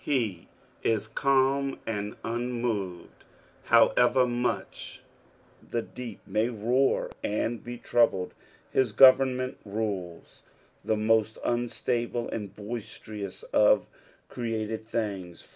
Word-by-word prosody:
He 110 Hz, -, -1 dB, 0.3 s
is 110 Hz, -1 st, 0 dB
calm 135 Hz, +2 st, +2 dB
and 105 Hz, -2 st, -3 dB
unmoved, 115 Hz, -6 st, -3 dB, 0.4 s
however 125 Hz, +1 st, +5 dB
much 120 Hz, 0 st, -3 dB, 0.7 s
the 115 Hz, -1 st, -1 dB
deep 120 Hz, -4 st, -8 dB
may 110 Hz, +2 st, +1 dB
roar 125 Hz, +4 st, +1 dB
and 115 Hz, +2 st, -1 dB
be 120 Hz, 0 st, -6 dB
troubled: 115 Hz, -6 st, +2 dB, 0.4 s
hu 130 Hz, -, +5 dB
government 130 Hz, +1 st, +5 dB
rules 100 Hz, -5 st, -4 dB, 0.4 s
the 110 Hz, -, +1 dB
most 110 Hz, 0 st, +2 dB
unstable 120 Hz, 0 st, -1 dB
and 105 Hz, -3 st, -5 dB
boisterous 110 Hz, -, -7 dB
of -, -, +5 dB, 0.4 s
created 110 Hz, -2 st, -3 dB
things. 100 Hz, -7 st, -4 dB
115 Hz, 95 wpm, -28 LUFS, 105-125 Hz, 0.7 s, however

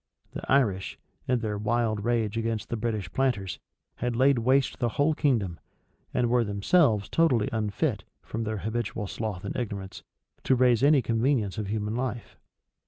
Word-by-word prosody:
The -, -, -6 dB
Irish, 110 Hz, -9 st, +2 dB, 0.3 s
in 125 Hz, -2 st, +1 dB
their 105 Hz, -2 st, -2 dB
wild 110 Hz, -1 st, 0 dB
rage 115 Hz, -2 st, 0 dB
against 115 Hz, -1 st, -2 dB
the -, -, -1 dB
British 110 Hz, -6 st, -3 dB
planters, 100 Hz, -10 st, 0 dB, 0.4 s
had 120 Hz, 0 st, -2 dB
laid 130 Hz, +1 st, +4 dB
waste 130 Hz, +3 st, +2 dB
the 120 Hz, -, +1 dB
whole 145 Hz, +2 st, +3 dB
kingdom, 115 Hz, -, 0 dB, 0.5 s
and 120 Hz, -, +1 dB
were 120 Hz, 0 st, +3 dB
themselves 105 Hz, -, +2 dB
totally 135 Hz, -7 st, +2 dB
unfit, 105 Hz, -3 st, -1 dB, 0.2 s
from 115 Hz, +1 st, -4 dB
their 110 Hz, 0 st, -2 dB
habitual 110 Hz, +1 st, -3 dB
sloth 100 Hz, -2 st, -4 dB
and -, -, -4 dB
ignorance, 100 Hz, -6 st, -5 dB, 0.4 s
to 130 Hz, -, +4 dB
raise 125 Hz, -2 st, +4 dB
any 140 Hz, -1 st, +5 dB
convenience 115 Hz, -3 st, 0 dB
of 105 Hz, -, -3 dB
human 105 Hz, +1 st, -2 dB
life. 120 Hz, -2 st, -4 dB
115 Hz, 160 wpm, -27 LUFS, 105-125 Hz, 0.5 s, any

